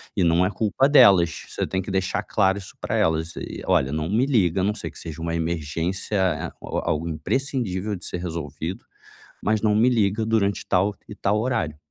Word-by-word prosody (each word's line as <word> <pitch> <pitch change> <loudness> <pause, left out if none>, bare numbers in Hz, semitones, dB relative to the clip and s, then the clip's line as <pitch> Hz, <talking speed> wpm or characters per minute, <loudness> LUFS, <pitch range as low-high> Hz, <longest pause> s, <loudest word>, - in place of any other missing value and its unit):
e 90 - +2
não 85 +2 +4
é - - +1
culpa 110 +7 +1
delas, 95 - +6
você - - -2
tem 95 - -1
que 95 - -6
deixar 95 0 -1
claro 95 -1 +2
isso 95 -1 -10
para - - -2
elas 80 +1 +1
e: - - -6
"Olha, 65 0 +2
não 75 +2 -2
me 115 +6 +2
liga 95 - +2
a - - 0
não 105 +2 +1
ser - - -6
que - - -12
seja 80 0 -7
uma 85 0 -2
emergência, 85 +4 -2
eh, 90 -5 0
ou - - -3
algo 80 +2 -1
imprescindível 105 - -2
de 90 - -9
ser 90 - -4
resolvido. 80 0 -5 0.6
Mas 110 +1 +1
não 110 - +3
me 110 +4 +4
liga 110 -2 +1
durante 100 -3 +1
tal 100 +2 +1
e - - -8
tal 105 0 0
horário". 95 - -1
95 Hz, 205 wpm, -24 LUFS, 85-105 Hz, 0.6 s, delas